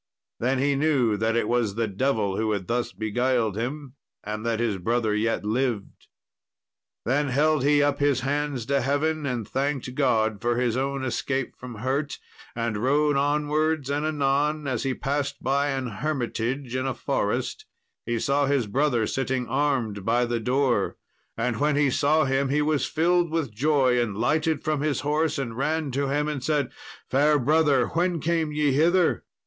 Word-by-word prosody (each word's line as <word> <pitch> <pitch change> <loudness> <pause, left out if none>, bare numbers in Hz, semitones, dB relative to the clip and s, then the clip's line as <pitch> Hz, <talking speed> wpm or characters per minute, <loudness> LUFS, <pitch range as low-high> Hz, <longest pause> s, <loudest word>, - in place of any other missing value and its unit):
Then 130 +3 +1
he 140 +2 +2
knew 135 -6 +2
that 110 +2 0
it 115 - +1
was 120 -4 0
the 115 0 0
devil 105 -2 0
who 110 +1 0
had 100 -3 -3
thus 120 +3 -1
beguiled 115 0 0
him, 130 +4 -4 0.3
and 105 +1 -5
that 115 -1 -1
his 110 -5 0
brother 110 +3 0
yet 110 0 0
lived. 115 -2 -2 1.0
Then 145 +4 +1
held 145 +2 +2
he 145 0 +4
up 145 -1 +1
his 145 -3 +2
hands 140 -2 -2
to 140 0 +1
heaven, 145 +3 0
and 120 -5 -3
thanked 135 -1 -2
God 110 -6 +1
for 120 0 0
his 120 -2 +1
own 135 +1 -1
escape 130 +2 -2
from 125 -2 -9
hurt, 135 +6 -2 0.4
and 115 -2 -2
rode 145 +6 +2
onwards; 150 +1 0
and 145 +1 -1
anon, 150 0 0
as 130 -4 -1
he 135 -2 -1
passed 140 +1 -3
by 140 +2 +1
an 135 -2 -2
hermitage 125 0 -3
in 130 +1 -1
a 135 - -2
forest, 435 -3 -2 0.4
he 120 0 -2
saw 140 +4 +1
his 140 -4 +1
brother 120 +1 +1
sitting 130 0 -2
armed 125 -6 0
by 120 +4 +2
the 120 -1 -1
door. 130 +2 +1 0.4
And 115 -1 -1
when 150 0 +2
he 145 -2 +3
saw 150 +4 +3
him 135 0 +1
he 150 +2 +2
was 150 -1 +1
filled 175 +2 +2
with 155 -8 -2
joy, 130 0 +2
and 105 -4 -2
lighted 155 +6 +1
from 155 -2 0
his 150 -3 0
horse, 150 +1 0
and 120 -5 -4
ran 150 +2 -1
to 140 +2 -1
him 145 +2 0
and 145 -4 -3
said, 150 -1 0 0.4
"Fair 150 +3 +3
brother, 145 -1 +3
when 175 +1 0
came 160 0 0
ye 150 -1 +1
hither?" 170 +6 +2
135 Hz, 175 wpm, -25 LUFS, 120-150 Hz, 1.0 s, he